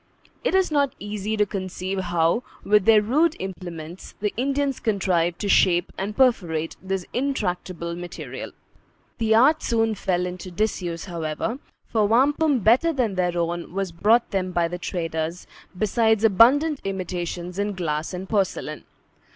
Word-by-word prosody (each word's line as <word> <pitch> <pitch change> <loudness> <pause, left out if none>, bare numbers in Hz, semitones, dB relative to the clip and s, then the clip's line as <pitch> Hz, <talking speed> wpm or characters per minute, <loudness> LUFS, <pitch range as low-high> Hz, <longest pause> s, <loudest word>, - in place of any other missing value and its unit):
It - - +1
is 380 -3 +2
not 285 -3 +1
easy 210 +1 -4
to 210 - +3
conceive 190 -1 -4
how, 175 +3 +1 0.2
with 210 -2 +3
their 220 -2 +6
rude 300 +9 +2
implements, 175 -3 -7
the 210 0 -1
Indians 275 +2 0
contrived 180 -5 +1
to 205 - -1
shape 175 -2 +3
and 205 +2 -4
perforate 170 -11 +2
this 190 -1 -3
intractable 180 - -2
material. 175 0 -7 0.7
The 220 -1 +3
art 295 +7 +5
soon 225 -1 +1
fell 180 -3 -1
into 180 +1 -6
disuse, 175 -3 -2
however; 170 - -3 0.3
for 215 -2 +1
wampum 275 +4 +3
better 245 - +4
than 250 -9 0
their 180 -2 0
own 170 +1 -2
was 195 -2 -2
brought 215 +8 +2
them 185 -2 -1
by 175 -1 +1
the 175 +1 -6
traders, 165 -1 -3 0.3
besides 220 +2 +2
abundant 265 +9 +5
imitations 180 -1 -4
in 205 0 -1
glass 155 -4 -2
and 185 +1 -6
porcelain. 200 -3 -1
195 Hz, 145 wpm, -24 LUFS, 175-225 Hz, 0.7 s, their